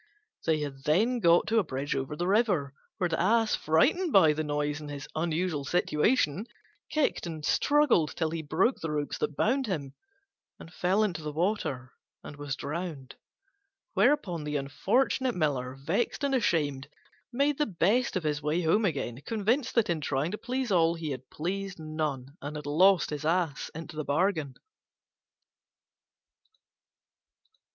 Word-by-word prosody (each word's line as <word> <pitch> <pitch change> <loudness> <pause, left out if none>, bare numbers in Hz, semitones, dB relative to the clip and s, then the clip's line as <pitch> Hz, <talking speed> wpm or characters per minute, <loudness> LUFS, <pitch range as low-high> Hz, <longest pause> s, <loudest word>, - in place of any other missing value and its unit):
They 155 -2 +2
had 140 -1 -6
then 220 +11 +2
got 170 -4 +5
to 225 0 +2
a - - +2
bridge 140 -3 -3
over 135 +2 -3
the 175 - -2
river, 190 - +2 0.2
where 185 -4 +1
the 165 -1 -1
Ass, 225 +4 +3
frightened 295 - +2
by 160 - +6
the 155 +1 -2
noise 145 0 -2
and 150 - -8
his 140 -1 -7
unusual 160 -1 -1
situation, 175 - +1 0.4
kicked 300 - 0
and 155 -2 -6
struggled 285 - +3
till 160 -2 -1
he 165 -1 -3
broke 170 - +1
the 165 - -4
ropes 150 -1 -2
that 150 - -2
bound 260 - +1
him, 145 -9 -3 0.7
and 165 - -12
fell 190 +5 +2
into 180 -6 -2
the 150 -1 -4
water 150 -7 -2 0.3
and - - -9
was 145 -2 -4
drowned. 150 -3 -5 0.8
Whereupon 180 - +2
the 150 0 -3
unfortunate 235 - +1
Miller, 135 -6 -1
vexed 170 - -2
and 280 -1 +1
ashamed, 145 - 0 0.4
made 280 +3 +1
the 295 - +2
best 205 +7 +1
of 185 - -1
his 150 -1 -1
way 155 +4 0
home 205 +7 +3
again, 135 -7 -2
convinced 230 +4 0
that 230 -3 +3
in 170 -3 -1
trying 145 +3 -1
to 210 - -3
please 255 -1 -2
all 170 -2 +3
he 160 -3 -4
had 130 -1 -7
pleased 195 +4 -4
none, 155 -4 -3 0.2
and 145 +2 -6
had 150 - -6
lost 175 +4 +4
his 150 -1 -4
Ass 160 -3 0
into 165 0 -8
the 155 - -3
bargain. 155 -2 0
165 Hz, 160 wpm, -29 LUFS, 145-205 Hz, 0.8 s, by